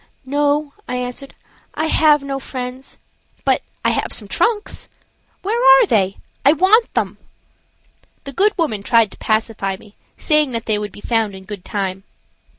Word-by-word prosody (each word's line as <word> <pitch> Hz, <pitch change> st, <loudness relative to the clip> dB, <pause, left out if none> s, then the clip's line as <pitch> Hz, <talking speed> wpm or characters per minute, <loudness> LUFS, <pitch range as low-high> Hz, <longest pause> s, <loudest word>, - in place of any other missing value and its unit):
"No," 290 Hz, +1 st, 0 dB, 0.2 s
I 250 Hz, -, -2 dB
answered, 250 Hz, +2 st, -5 dB, 0.4 s
"I 310 Hz, -, 0 dB
have 305 Hz, -2 st, +4 dB
no 275 Hz, -1 st, -3 dB
friends, 255 Hz, 0 st, -7 dB, 0.5 s
but -, -, +3 dB, 0.2 s
I -, -, +4 dB
have -, -, -1 dB
some -, -, +2 dB
trunks. 440 Hz, -2 st, -1 dB, 0.5 s
Where 455 Hz, +5 st, 0 dB
are -, -, +8 dB
they? 200 Hz, -, +1 dB, 0.3 s
I 285 Hz, -, +6 dB
want 400 Hz, +8 st, +4 dB
them." -, -, -1 dB, 1.0 s
The 275 Hz, -, -8 dB
good 410 Hz, +7 st, +2 dB
woman 260 Hz, -, -1 dB
tried 225 Hz, -1 st, +3 dB
to -, -, -14 dB
pacify 215 Hz, -3 st, -1 dB
me, 205 Hz, +1 st, -18 dB, 0.2 s
saying 300 Hz, -4 st, +2 dB
that 230 Hz, -1 st, -3 dB
they 215 Hz, -2 st, +1 dB
would 210 Hz, -1 st, -5 dB
be 205 Hz, -, -13 dB
found 225 Hz, -4 st, 0 dB
in 190 Hz, -, -11 dB
good 200 Hz, -2 st, -8 dB
time. 195 Hz, -2 st, -3 dB
260 Hz, 160 wpm, -19 LUFS, 215-305 Hz, 1.0 s, are